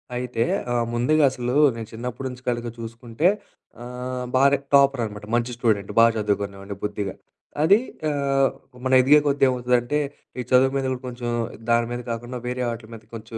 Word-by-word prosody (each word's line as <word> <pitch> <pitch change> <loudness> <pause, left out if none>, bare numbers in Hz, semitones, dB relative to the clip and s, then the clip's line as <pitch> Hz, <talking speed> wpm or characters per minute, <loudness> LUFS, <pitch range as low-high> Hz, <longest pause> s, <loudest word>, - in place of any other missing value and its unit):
అయితే 125 -2 -1 0.3
ఆహ్, 120 -1 +1
ముందుగా 145 +6 +2
అసలు 125 -1 -3 0.2
నేను 115 -1 -6
చిన్నప్పుడి 125 +3 -5
నుంచి 125 0 -10
కనుక 120 -1 -2
చూసుకుంటే, 115 +6 -2 0.6
ఆహ్, 125 +1 -5
బానే 140 +2 +5 0.2
టాపర్ 140 -2 +5
అనమాట. 105 -1 -8
మంచి 120 +1 0
స్టూడెంట్ 105 -5 0
బా 115 - +8
చదువుకునేవాడిని 100 -1 -2
బుద్ధిగా. 105 -2 -3 0.5
అది 195 +7 +6 0.3
ఆహ్, 140 -2 +2 0.4
మనం 130 0 +4
ఎదిగే 145 +4 +6
కొద్ది 140 0 +1
ఏమవుతదంటే, 125 +2 +1 0.4
ఈ - - 0
చదువు 130 +1 +5
మీద 130 -1 -1
కొంచెం 120 -1 -5 0.4
దాని 115 0 +3
మీద 120 0 -3
కాకుండా 120 +2 -5
వేరే 125 0 -2
ఆటిల 115 -1 -8
మీద 110 - -13
కొంచెం 115 0 -8
125 Hz, 155 wpm, -23 LUFS, 115-130 Hz, 0.6 s, బా